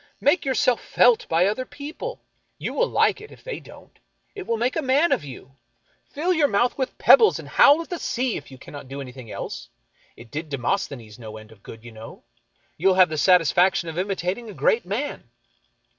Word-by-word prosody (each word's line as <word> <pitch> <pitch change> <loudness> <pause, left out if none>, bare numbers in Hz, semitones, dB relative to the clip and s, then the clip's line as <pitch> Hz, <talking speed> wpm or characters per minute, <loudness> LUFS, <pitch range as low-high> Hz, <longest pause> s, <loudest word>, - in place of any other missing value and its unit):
Make 290 +4 +2
yourself 260 -2 +1
felt 245 -2 +3
by 165 +2 +3
other 215 +6 -1
people. 290 - -8 0.3
You - - -5
will - - +1
like - - +1
it, 430 - -12
if - - -16
they - - -6
don't. - - -16 0.3
It 400 -3 -8
will 230 - 0
make 245 +3 -1
a 320 - 0
man 285 +5 +2
of - - +1
you. 135 0 -12 0.5
Fill 345 +6 -1
your 310 -4 +3
mo; 210 0 +2
ith 245 - -3
W'ith 260 -2 -4
pebbles, 455 -3 +6
and - - -9
howl 290 +3 +6
at - - -20
the 350 - -3
sea, 250 -1 -2
if - - -8
you 130 - -12
cannot 140 +1 -11
do 135 +2 -7
anything 130 -3 -9
else. - - -7 0.5
It 115 -1 -14
did 155 +2 -5
Demosthenes 125 - -3
no 110 -2 -9
end 110 0 -14
of 105 -3 -18
good, 110 +2 -12
you 120 - -11
know. 110 0 -12 0.5
You 180 - +1
will 190 - +4
have 185 -2 +5
the 155 - -4
satisfaction 180 +1 +3
of 165 +2 -5
imitating 195 +3 -3
a 205 - -10
great 225 -5 +1
man." 210 - -4
195 Hz, 210 wpm, -23 LUFS, -, 0.5 s, pebbles